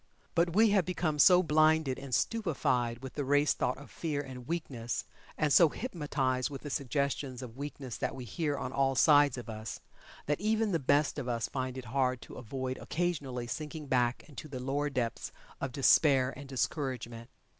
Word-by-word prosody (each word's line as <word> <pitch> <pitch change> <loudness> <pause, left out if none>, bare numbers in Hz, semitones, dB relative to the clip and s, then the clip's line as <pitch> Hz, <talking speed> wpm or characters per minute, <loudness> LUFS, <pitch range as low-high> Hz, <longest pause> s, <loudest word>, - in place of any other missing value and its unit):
But 170 0 +1
we 220 0 +6
have 200 -3 +4
become 165 -4 -1
so 180 +3 +7
blinded 155 -3 +3
and 135 -1 -9
stupefied 125 - 0
with 130 - -7
the 145 - -2
race 145 +2 +3
thought 125 - -1
of 140 - -13
fear 155 -4 -3
and 130 -3 -7
weakness, 130 -9 -3 0.3
and 150 -2 +2
so 170 -3 +7
hypnotized 145 - -1
with 140 -2 -8
the 145 - -5
suggestions 140 -1 -2
of 120 -2 -9
weakness 140 -3 -6
that - - -2
we 130 -2 -7
hear 150 +1 -2
on 130 -1 -4
all 135 -1 +2
sides 145 -1 +5
of 125 - -7
us, 110 0 -6 0.5
that 150 +4 -1
even 220 0 +1
the 165 - +1
best 145 +2 +2
of 130 - -5
us 115 -2 -1
find 130 -1 -3
it 130 - -6
hard 130 +1 0
to - - -12
avoid 130 +1 -4
occasionally 145 -8 -2
sinking 150 +4 -5
back 125 -2 +1
into 150 0 -9
the 135 -3 -6
lower 140 +3 -1
depths 125 -4 -2 0.3
of 140 - -3
despair 135 0 +4
and 140 +1 -9
discouragement. 125 -4 -3
140 Hz, 185 wpm, -31 LUFS, 130-155 Hz, 0.5 s, so